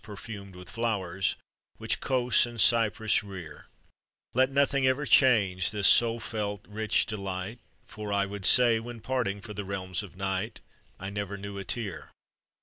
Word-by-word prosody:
perfumed 100 -2 -9
with 90 0 -11
flowers 95 -5 -1 0.4
Which - - -1
Cos 125 -3 +2
and 120 -1 -9
Cyprus 110 0 +4
rear; 95 -5 -10 0.7
Let 130 +1 +3
nothing 140 -1 +2
ever 130 +3 +1
change 100 -11 +4
this 105 -2 +2
soul 115 0 +5
felt, 105 -3 -4
rich 110 +1 0
delight; 100 +1 -5 0.3
For 105 -1 -7
I 100 0 +2
would 100 0 -7
say, 120 +2 +6
when 115 0 -9
parting 120 -6 -2
for 105 - -8
the 105 0 -5
realms 95 -2 -3
of 100 -4 -11
night, 95 +3 -3 0.4
I 95 +1 -5
never 100 -1 -4
knew 100 0 -7
a - - -5
tear. 100 -6 -4
105 Hz, 155 wpm, -28 LUFS, 95-115 Hz, 0.7 s, say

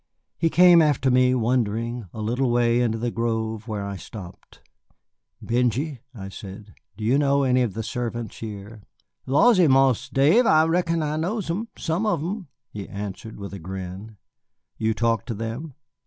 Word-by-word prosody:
He 165 - +1
came 175 0 +7
after 140 -4 +2
me, 125 0 +4
wondering, 115 -1 -1
a 110 - -7
little 125 +4 0
way 120 0 +2
into 115 -2 0
the 120 +1 -2
grove, 110 -1 -2
where 105 -3 -3
I 100 -1 -5
stopped. 95 -3 -11 0.8
"Benjy," 125 +4 0 0.2
I 95 -3 -7
said, 100 +1 -10 0.2
"do 110 - -7
you 125 +6 +3
know 140 -1 +2
any 130 -1 +3
of 110 -6 -1
the 115 - -3
servants 120 -1 -4
here?" 105 0 -8 0.5
"Lawsy, 180 - +5
Marse 135 -3 +3
Dave, 160 - +4
I 155 0 +5
reckon 165 -1 +1
I 150 0 -2
knows 180 +2 -2
'em, 210 +7 -3
some 175 +6 -1
of 175 -7 +1
'em," 190 +1 -4 0.2
he 100 -2 -7
answered 100 +2 -7
with 100 -1 -7
a 100 - -6
grin. 95 +4 -7 0.6
"You 110 0 0
talk 115 -2 +1
to 115 - -3
them?" 115 +7 -5
120 Hz, 170 wpm, -24 LUFS, 110-150 Hz, 0.8 s, came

